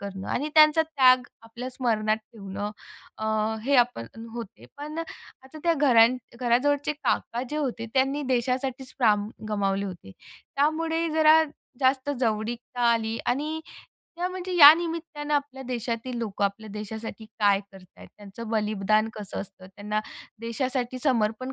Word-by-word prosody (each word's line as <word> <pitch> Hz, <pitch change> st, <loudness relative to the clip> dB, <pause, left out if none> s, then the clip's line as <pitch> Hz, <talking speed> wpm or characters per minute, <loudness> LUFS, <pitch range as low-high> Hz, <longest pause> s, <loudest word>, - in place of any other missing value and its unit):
करणं 195 Hz, -1 st, -6 dB
आणि 295 Hz, +4 st, -1 dB
त्यांचा 305 Hz, +1 st, +7 dB
त्याग 260 Hz, -5 st, +4 dB, 0.2 s
आपल्या 235 Hz, +3 st, -7 dB
स्मरणात 220 Hz, -4 st, 0 dB, 0.2 s
ठेवणं 205 Hz, -1 st, -5 dB, 0.5 s
अ, 220 Hz, -, -4 dB, 0.4 s
हे 280 Hz, +2 st, +3 dB
आपण 240 Hz, -, +2 dB, 0.3 s
होते. 230 Hz, -2 st, -8 dB
पण 300 Hz, +2 st, -6 dB
आता 310 Hz, -3 st, -10 dB
त्या 340 Hz, -, +4 dB
घरां 245 Hz, -6 st, +6 dB, 0.3 s
घराजवळचे 280 Hz, +5 st, +2 dB
काका 245 Hz, -4 st, -1 dB
जे 300 Hz, -, -3 dB
होते 245 Hz, -6 st, -2 dB
त्यांनी 270 Hz, +2 st, +2 dB
देशासाठीच 260 Hz, +1 st, -1 dB
प्राण 210 Hz, -4 st, +3 dB, 0.2 s
गमावले 200 Hz, -1 st, 0 dB
होते. 170 Hz, -, -9 dB, 0.4 s
त्यामुळे 325 Hz, +3 st, +1 dB
जरा 315 Hz, 0 st, +6 dB, 0.4 s
जास्त 260 Hz, +1 st, +2 dB
जवळीकता 235 Hz, +2 st, -2 dB
आली 225 Hz, 0 st, -1 dB
आणि 305 Hz, +5 st, -1 dB, 0.6 s
त्या 355 Hz, +1 st, -1 dB
म्हणजे 370 Hz, 0 st, -5 dB
या 290 Hz, -2 st, +12 dB
निमित्तानं 325 Hz, -3 st, -3 dB
आपल्या 280 Hz, -2 st, -2 dB
देशातील 240 Hz, 0 st, -3 dB
लोकं 205 Hz, -3 st, -2 dB
आपल्या 205 Hz, +2 st, -3 dB
देशासाठी 220 Hz, +2 st, -7 dB
काय 200 Hz, -2 st, +4 dB
करतात, 190 Hz, -2 st, -15 dB
त्यांचं 210 Hz, +2 st, -9 dB
बलिदान 215 Hz, 0 st, +1 dB
कसं 205 Hz, -2 st, -6 dB
असतं, 185 Hz, -1 st, -11 dB
त्यांना 210 Hz, +2 st, -3 dB, 0.4 s
देशासाठी 255 Hz, +2 st, -2 dB
समर्पण 250 Hz, -1 st, 0 dB
245 Hz, 135 wpm, -26 LUFS, 215-290 Hz, 0.6 s, या